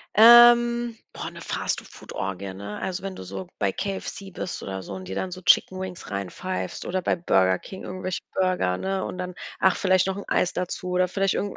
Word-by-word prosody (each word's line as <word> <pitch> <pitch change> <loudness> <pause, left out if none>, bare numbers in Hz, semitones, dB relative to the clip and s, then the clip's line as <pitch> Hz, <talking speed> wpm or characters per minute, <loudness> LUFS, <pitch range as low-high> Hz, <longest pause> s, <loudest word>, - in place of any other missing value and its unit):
Ähm, 240 +1 +7 0.2
boah, - - -6
ne, - - -11
Fast-Food-Orgie, 95 0 -4
ne? 100 +2 -7
Also 190 0 -3
wenn 195 0 -5
du - - -8
so 95 0 -6
bei 100 -2 +1
KFC 195 - -5
bist 185 - -5
oder 95 -1 -5
so 100 - -7
und 95 -1 -7
dir 95 - -5
dann 185 - -2
so 185 +1 -7
Chickenwings 185 - +2
reinpfeifst 100 - -4
oder 185 +1 -1
bei - - +1
Burger 95 - +3
King 190 - -10
irgendwelche 185 0 -4
Burger, 185 - +1
ne? 190 - -2
Und - - -6
dann, 180 0 -4 0.3
ach, 190 - +4
vielleicht 185 -1 +3
noch 190 0 -1
'n 200 - -6
Eis 180 - +1
dazu 180 0 -3
oder 180 0 +2
vielleicht 195 +2 +1
irgend 205 - -2
185 Hz, 195 wpm, -25 LUFS, -, 0.3 s, Ähm